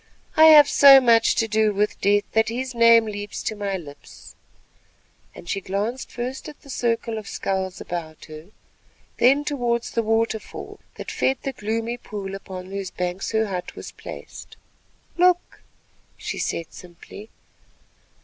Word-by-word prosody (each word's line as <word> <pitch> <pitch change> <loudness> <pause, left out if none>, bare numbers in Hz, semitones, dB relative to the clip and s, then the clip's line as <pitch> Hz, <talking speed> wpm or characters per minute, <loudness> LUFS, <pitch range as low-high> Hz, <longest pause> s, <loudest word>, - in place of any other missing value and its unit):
"I 315 - +7
have 300 -2 +9
so 275 -1 +8
much 235 -3 +4
to 225 - +1
do 215 -1 +1
with 210 +1 -1
Death 205 +1 +3
that 220 0 +2
his 255 +2 -4
name 230 -1 +6
leaps 205 -1 -6
to 215 - -3
my 200 -2 -3
lips," 145 -5 -13 1.0
and - - -12
she 195 +3 -2
glanced 205 +7 -3
first 250 +4 -5
at 300 - -13
the 275 - -12
circle 230 -2 -1
of 210 - -11
skulls 190 -1 -3
about 160 -3 -7
her, 155 +1 -11 0.7
then 275 +4 +4
towards 240 -5 -1
the 230 - 0
waterfall 225 0 -2 0.2
that - - -7
fed 265 0 0
the 275 - -3
gloomy 230 +2 -3
pool 200 -5 -7
upon 190 -1 -8
whose 195 -1 -4
banks 180 +1 -4
her 220 0 +2
hut 185 -3 -5
was - - -9
placed. - - -11 0.6
"Look," 360 0 +2 0.6
she - - -5
said 165 - -3
simply. 180 +4 -12
220 Hz, 150 wpm, -23 LUFS, 195-240 Hz, 1.0 s, have